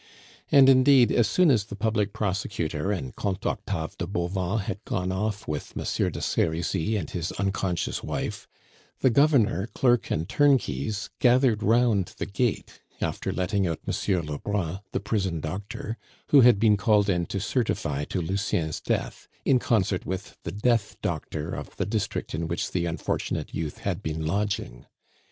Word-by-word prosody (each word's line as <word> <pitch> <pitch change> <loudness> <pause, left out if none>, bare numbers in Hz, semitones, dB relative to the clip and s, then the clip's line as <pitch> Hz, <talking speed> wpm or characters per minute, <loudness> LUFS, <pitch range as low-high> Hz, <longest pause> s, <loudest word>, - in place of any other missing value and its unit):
And 135 -2 +8
indeed, 130 -1 +6
as 115 -3 +3
soon 165 - +4
as 110 -6 +2
the 105 - -8
public 105 -1 0
prosecutor 95 -4 -2
and 70 -11 -4
Comte 95 -2 -3
Octave 80 -1 -2
de 85 - -2
Bauvan 90 +2 -1
had 95 +2 -5
gone 90 -3 -2
off 105 +2 -2
with 75 -1 -5
Monsieur - - 0
de - - -6
Serizy 85 +5 0
and 85 -7 -3
his 85 -2 -3
unconscious 95 -3 -1
wife, - - -4 0.5
the 130 - +4
Governor, 120 -7 +3
clerk, 120 -2 +2
and 80 +2 -1
turnkeys 110 - +1
gathered 125 -3 +4
round 110 -3 +2
the - - -2
gate, 110 +2 -2 0.2
after - - -2
letting 95 +1 0
out 80 -2 -4
Monsieur 95 -4 0
Lebrun, 85 +4 -3
the - - -1
prison 100 -5 -1
doctor, 100 +7 -5 0.3
who 140 - +7
had 120 -3 +7
been 105 -1 +4
called 105 0 +3
in 90 -3 +1
to 100 - -3
certify 85 - -1
to 90 +2 -2
Lucien's 85 -3 -1
death, - - -2 0.2
in 130 - +4
concert 100 -6 +1
with 95 +1 -5
the - - -5
"death 110 +1 0
doctor" 75 0 -3
of - - -7
the - - 0
district 105 0 -2
in 80 +1 -2
which 85 +1 -2
the 85 -1 0
unfortunate 85 - -3
youth 80 -2 -3
had - - -3
been 80 0 -3
lodging. 100 -8 -2
100 Hz, 160 wpm, -26 LUFS, 85-110 Hz, 0.5 s, And